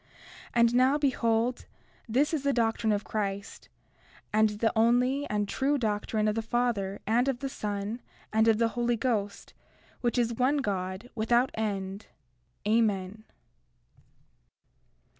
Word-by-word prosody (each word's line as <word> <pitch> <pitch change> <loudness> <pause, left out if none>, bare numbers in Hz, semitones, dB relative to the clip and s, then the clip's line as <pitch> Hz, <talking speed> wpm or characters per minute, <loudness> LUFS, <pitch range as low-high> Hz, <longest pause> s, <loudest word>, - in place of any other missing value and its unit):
And 235 0 +4
now, 260 +3 +4
behold, 240 -4 0 0.4
this 280 +8 +2
is 310 - 0
the 280 0 +1
doctrine 225 -2 +1
of 205 -1 0
Christ, 200 -1 -4 0.6
and 215 0 +4
the 210 +2 0
only 250 +5 +2
and 205 -1 0
true 280 +7 0
doctrine 215 -2 -1
of 210 - +2
the 225 - -1
Father, 225 -4 -1
and 240 +4 +2
of 270 -3 0
the 275 - -4
Son, 210 0 -4 0.3
and 220 +1 +3
of 225 -1 +4
the 230 0 +2
Holy 240 0 0
Ghost, 215 -4 -2 0.5
which 240 -1 -1
is 235 -1 +1
one 260 +5 +2
God, 190 -3 -3
without 240 +3 +2
end. 200 -2 -3 0.6
Amen. 210 -2 +1
225 Hz, 135 wpm, -28 LUFS, 210-245 Hz, 0.6 s, And